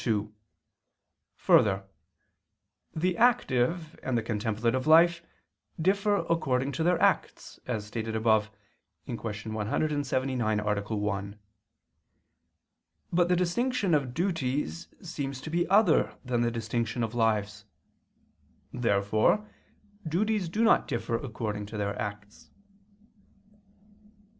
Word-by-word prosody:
2: 105 -3 -1 1.0
Further, 95 -2 +3 1.1
the 175 +3 0
active 165 - +2
and 130 -2 -1
the 115 - -1
contemplative 115 +4 -1
life 170 +2 +6 0.6
differ 200 +4 +1
according 135 -5 0
to 160 - -4
their 175 +1 +2
acts, - - 0
as 110 -4 -2
stated 110 +1 -4
above 110 -1 +2 0.6
(Q. 120 - -4
179, 115 +2 -1
A. 105 -1 0 0.2
1). 100 0 -3 1.7
But 175 0 +3
the 180 - +4
distinction 195 +3 0
of 135 -4 0
duties 165 -2 -2 0.2
seems 140 -6 -5
to 155 - -7
be 175 +1 +1
other 195 -4 +3
than 120 -1 0
the 120 - +2
distinction 115 +1 -2
of 110 0 -3
lives. 105 -3 0 1.1
Therefore 110 - +1 0.6
duties 195 +2 0
do 215 +7 0
not 230 - +4
differ 120 0 -3
according 110 -4 -4
to 110 - -7
their 100 -1 -2
acts. 105 0 -7
125 Hz, 105 wpm, -28 LUFS, 110-170 Hz, 1.7 s, life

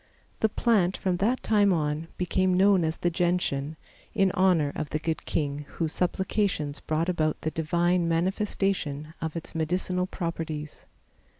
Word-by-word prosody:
The 220 - +3
plant 205 -5 +2
from 185 -2 0
that 230 +7 +1
time 205 -2 +4
on 155 -1 -1
became 185 +1 +1
known 195 -2 +5
as 160 0 -1
the 175 - 0
Gentian, 165 -4 0 0.4
in 195 -3 +3
honor 180 -7 +3
of 155 -2 -3
the - - -1
good 160 +1 -3
king, 145 -1 -2
whose 160 -2 0
supplications 180 -5 -1
brought 155 +2 -1
about 155 -4 0
the 155 - -2
divine 170 +2 +1
manifestation 165 -3 -1
of 160 -1 -3
its 165 - -5
medicinal 180 +3 0
properties. 160 -4 -5
170 Hz, 145 wpm, -27 LUFS, 155-185 Hz, 0.4 s, known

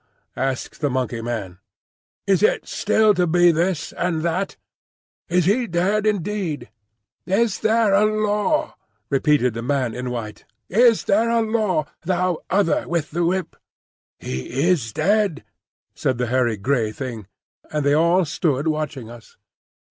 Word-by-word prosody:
asked 135 +3 -3
the 145 - +1
Monkey 125 -3 -2
man. 105 -6 -5 0.7
"Is 195 -2 +2
it 215 - +2
still 215 0 +3
to 180 -2 +1
be 175 +1 +5
this 170 0 -1
and 170 -3 -1
that? 175 +3 -2 0.7
Is 180 -1 +2
he 235 +6 +2
dead 200 +5 +1
indeed?" 200 -5 -2 0.6
"Is 205 +2 +1
there 220 -2 +2
a 205 +2 +5
Law?" 215 +9 0 0.4
repeated 140 -3 +2
the 115 - -5
man 130 -1 -1
in 125 0 -4
white. 115 -3 -6 0.3
"Is 230 +3 +4
there 220 +4 +2
a 230 0 +2
Law, 215 -8 0 0.2
thou 180 -1 0
Other 190 -3 +1
with 165 -3 -2
the 170 +2 -1
Whip?" 185 +2 -1 0.6
"He 65 - -4
is 125 -11 0
dead," 195 - +1 0.5
said 130 -2 -1
the 125 - 0
hairy 120 -4 +2
grey 110 +1 0
Thing. 115 -4 -6 0.4
And 150 -2 -1
they 145 - +4
all 170 +4 +3
stood 150 -1 -1
watching 150 -6 -2
us. 120 -1 -14
170 Hz, 145 wpm, -22 LUFS, 130-200 Hz, 0.7 s, be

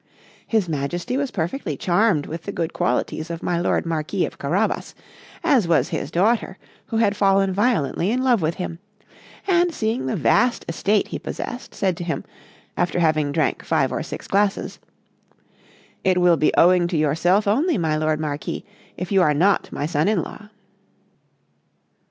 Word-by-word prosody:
His 220 -5 +1
Majesty 170 - -3
was 280 0 -1
perfectly 170 - -3
charmed 185 -5 +2
with 165 +2 -6
the 200 - -3
good 165 -4 -3
qualities 155 +6 -1
of 170 -1 -6
my 175 -1 0
lord 175 - 0
Marquis 165 +3 -1
of - - -9
Carabas, 180 +10 -1 0.5
as 275 - +3
was 155 -6 +2
his - - -3
daughter 200 +1 +1 0.3
who 225 - -2
was 210 -3 +2
fallen 195 -1 +3
violently 195 - +1
in 250 +3 0
love 245 -6 +3
with 160 +1 0
him; 170 -2 -5 0.7
and 350 -2 +3
seeing 220 - -2
the - - -1
vast 245 -1 +2
estate 200 +5 0
he - - -4
possessed, 245 +2 -6
said 190 -2 0
to 175 - -5
him, 170 -1 -3 0.5
after 175 0 0
having 155 -3 +2
drank - - 0
five - - +1
or - - -2
six - - -7
glasses: 200 0 0 1.2
"It 185 -1 +2
will 175 -1 +5
be 155 - +3
owing 175 0 +5
to 170 - -1
yourself 175 +7 +2
only, 285 - +2
my 160 -4 0
lord 155 0 0
Marquis, 150 -1 -4 0.3
if 180 +1 -5
you 195 -1 +4
are 150 -4 +3
not 190 +6 +2
my 145 - -3
son 155 +1 0
in 210 -5 +2
law." 210 -1 -10
180 Hz, 170 wpm, -22 LUFS, 160-210 Hz, 1.2 s, will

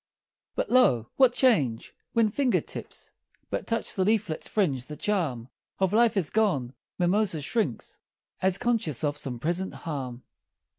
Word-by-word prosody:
But, - - -2
lo, 125 - +4
what 260 -2 +6
change! 150 - +2 0.2
When 225 -2 +3
finger 260 +1 +2
tips - - -9 0.4
But - - -3
touch 230 0 -1
the 190 - +1
leaflets' 210 -5 0
fringe, 140 - 0
the 150 - -7
charm 155 - -1 0.3
Of 190 0 +1
life 230 -1 +4
is 175 -6 0
gone 160 - +1 0.2
Mimosa 180 -1 +1
shrinks, 145 - -2 0.4
As 190 0 +2
conscious 220 - -1
of 145 -1 +1
some 130 -4 -5
present 175 +8 -2
harm. 130 -6 -4
180 Hz, 145 wpm, -27 LUFS, 140-220 Hz, 0.4 s, what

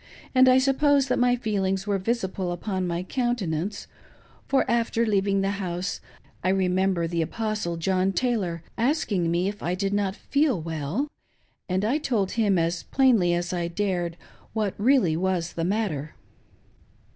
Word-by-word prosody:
and 260 0 +6
I 255 - +6
suppose 275 +1 +3
that 250 - +1
my 245 0 +4
feelings 195 -4 -1
were 200 -2 0
visible 190 -4 -2
upon 185 +1 -2
my 170 +1 -2
countenance, 200 - -2 0.6
for, 275 - +2
after 235 0 +1
leaving 200 -2 +1
the 195 0 0
House, 180 0 -3 0.4
I 185 - +2
remember 185 -1 +1
the 165 0 -1
Apostle 210 -1 -2
John 185 +3 +1
Taylor 195 -9 -1 0.2
asking 225 - +1
me 175 +2 +1
if 205 +1 -5
I 175 +2 -1
did 195 +1 -1
not 200 -1 0
feel 280 - +1
well, 160 - -2 0.6
and 185 +3 0
I 265 +8 +1
told 220 -10 0
him 210 -5 +2
as 170 0 0
plainly 230 -10 +3
as 175 +1 -2
I 175 -1 -1
dared 175 -2 -2 0.4
what 215 -3 0
really 230 - +3
was 175 -1 -1
the 165 - -3
matter. 180 -8 -2
195 Hz, 155 wpm, -25 LUFS, 175-230 Hz, 0.6 s, and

